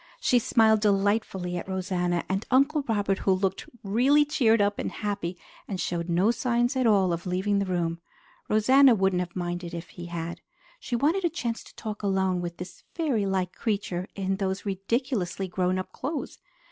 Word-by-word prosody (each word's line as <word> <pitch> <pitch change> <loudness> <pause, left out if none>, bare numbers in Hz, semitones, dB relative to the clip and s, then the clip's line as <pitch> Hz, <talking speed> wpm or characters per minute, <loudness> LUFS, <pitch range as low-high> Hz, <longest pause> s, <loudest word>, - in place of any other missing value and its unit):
She 250 - +3
smiled 220 -1 +4
delightfully 195 -3 +1
at 175 - -6
Rosanna 180 -2 -1
and 190 +1 -1
at - - -13
Uncle 280 +3 +3
Robert, 205 -3 +1
who 195 - +1
looked 190 0 -2
really 255 +9 +4
cheered 240 -7 +3
up 205 0 +1
and - - -2
happy 200 -4 -3 0.3
and 190 - -4
showed 170 -1 -2
no 180 +6 +3
signs 240 +1 0
at 255 -2 +2
all 195 -5 +4
of 170 +2 -4
leaving 190 +3 +1
the 200 - -1
room. 170 -2 -1 0.5
Rosanna 255 +4 +6
wouldn't 190 -2 +2
have 180 -1 -4
minded 175 -1 -4
if 170 0 -7
he 175 0 -9
had. 170 0 -5 0.4
She 255 - -3
wanted 315 +10 +1
a 345 - +3
chance 235 -8 -3
to - - -16
talk 215 -2 -6
alone 190 -3 +1
with 170 -1 -5
this 180 +1 -9
fairy 265 - 0
like 190 -2 -1
creature 195 -4 -2
in 195 -1 -1
those 190 0 -2
ridiculously 195 -1 -1
grown 185 0 0
up 185 - -5
clothes. 295 +3 -5
195 Hz, 185 wpm, -27 LUFS, 180-230 Hz, 0.5 s, Rosanna